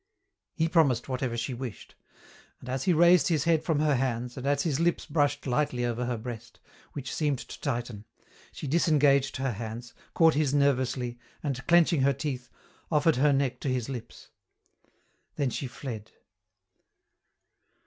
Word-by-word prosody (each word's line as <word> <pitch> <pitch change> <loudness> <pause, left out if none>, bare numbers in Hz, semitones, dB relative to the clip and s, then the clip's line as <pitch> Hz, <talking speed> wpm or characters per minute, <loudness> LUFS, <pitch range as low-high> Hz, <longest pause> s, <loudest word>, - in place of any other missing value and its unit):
He 160 -1 +1
promised 155 -8 +2
whatever 130 -2 -2
she 120 +3 -2
wished. 120 -3 -7 0.7
And 125 - -10
as 130 0 -2
he 185 - +4
raised 175 +1 +5
his 155 -5 +1
head 165 -2 +2
from 160 -2 0
her 155 -1 +3
hands 125 -1 -2
and 135 0 -5
as 140 0 +2
his 150 -4 0
lips 170 +1 +1
brushed 145 -1 0
lightly 125 -2 0
over 120 +1 -2
her 120 -1 -1
breast, 115 0 -8 0.3
which 135 -3 -5
seemed 145 -3 0
to - - -10
tighten, 120 -6 -3 0.5
she - - -8
disengaged 145 -3 +3
her 135 -1 -1
hands, 115 +2 -7 0.2
caught 165 -1 +5
his 145 -1 +1
nervously, 130 -3 +1 0.2
and, 135 -3 -3
clenching 170 -3 +4
her 140 +1 +3
teeth, 130 -2 -4 0.4
offered 150 -1 +3
her 145 +3 +4
neck 135 -2 0
to 140 - -3
his 125 -1 -1
lips. 125 -4 -8 1.1
Then 135 -3 0
she 135 - -3
fled. 115 -4 -7
135 Hz, 160 wpm, -28 LUFS, 125-150 Hz, 1.1 s, raised